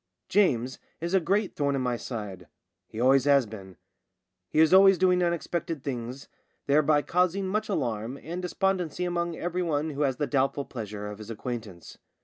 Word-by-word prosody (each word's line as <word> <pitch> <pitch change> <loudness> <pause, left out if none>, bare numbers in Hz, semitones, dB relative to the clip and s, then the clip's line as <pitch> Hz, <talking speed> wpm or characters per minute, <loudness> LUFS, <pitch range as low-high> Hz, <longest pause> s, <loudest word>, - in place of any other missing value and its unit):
James 130 - +2 0.2
is 170 +3 -3
a 190 - +5
great 195 +4 0
thorn 140 -1 0
in 135 - -1
my 125 -1 0
side; 105 - -6 0.4
he 110 - -8
always 130 +2 +4
has 140 -3 +5
been. 95 -4 -11 0.7
He - - -4
is 160 +2 +5
always 195 0 +7
doing 180 0 +3
un 175 -1 +2
expected 165 -3 -3
things 125 0 -5 0.2
— - - -46
thereby 145 +1 +3
causing 180 +2 +1
much 215 +3 -1
alarm 120 - -2
and 175 +3 -5
despondency 180 -2 -1
among 170 -1 -1
everyone 165 -4 -1
who 145 0 -4
has 135 -3 +1
the 145 - -1
doubtful 140 0 0
pleasure 105 -4 -6
of 105 0 -7
his 110 0 -9
acquaintance. 115 -6 -7
145 Hz, 175 wpm, -27 LUFS, 120-175 Hz, 0.7 s, always